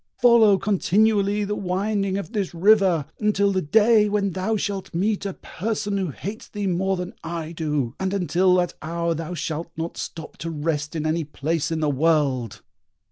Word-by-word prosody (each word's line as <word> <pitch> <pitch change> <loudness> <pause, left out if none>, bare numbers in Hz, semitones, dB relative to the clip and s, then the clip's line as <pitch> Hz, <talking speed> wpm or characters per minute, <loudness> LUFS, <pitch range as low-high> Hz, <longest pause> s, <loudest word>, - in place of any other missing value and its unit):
Follow 230 -4 +6
continually 205 +1 +2
the 205 +1 -2
winding 195 +1 -1
of 200 - -5
this 200 -6 -2
river, 185 -4 +4
until 200 -2 +2
the 190 -1 0
day 215 +5 +4
when 200 -1 0
thou 190 +5 -1
shalt 195 -3 -4
meet 200 +3 0
a 195 - -4
person 210 +1 -3
who 190 -3 -1
hates 205 - -7
thee 205 -1 -4
more 190 +1 0
than 180 0 -5
I 165 -1 -4
do, 150 -7 -2
and 190 0 -1
until 185 -1 +2
that 175 -1 +1
hour 170 +1 -1
thou 165 +2 -5
shalt 160 +1 -4
not 165 +1 -4
stop 160 -2 -7
to 165 - -5
rest 150 0 -2
in 155 -1 -2
any 160 +1 0
place 150 +2 -2
in 160 -1 -2
the 155 - +1
world!" 140 -6 +1
185 Hz, 180 wpm, -23 LUFS, 165-205 Hz, -, Follow